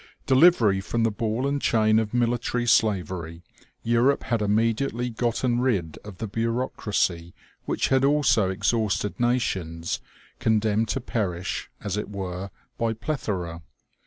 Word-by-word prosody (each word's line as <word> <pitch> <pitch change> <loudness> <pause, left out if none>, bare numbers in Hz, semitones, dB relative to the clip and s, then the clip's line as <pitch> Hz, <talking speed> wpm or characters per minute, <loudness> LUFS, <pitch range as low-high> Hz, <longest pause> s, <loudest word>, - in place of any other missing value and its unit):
Delivery 130 - +5
from 115 +5 -1
the 115 - +2
ball 110 +4 -2
and 140 0 -1
chain 110 -1 +3
of 110 -2 -2
military 120 0 0
slavery, 90 -7 +1 0.4
Europe 120 +4 +2
had 115 -2 -1
immediately 115 +4 0
gotten 120 +1 0
rid 100 -11 -1
of 105 -3 -10
the 110 - -4
bureaucracy 105 -6 -1 0.3
which - - 0
had 135 0 +3
also 135 -8 +3
exhausted 105 +2 0
nations, 95 -9 -1 0.4
condemned 110 0 +2
to - - -2
perish, 95 -7 -3
as 105 -1 -2
it 105 - -3
were, 95 -1 -5 0.3
by 115 -1 +1
plethora. 105 - -4
110 Hz, 130 wpm, -25 LUFS, 95-120 Hz, 0.4 s, Delivery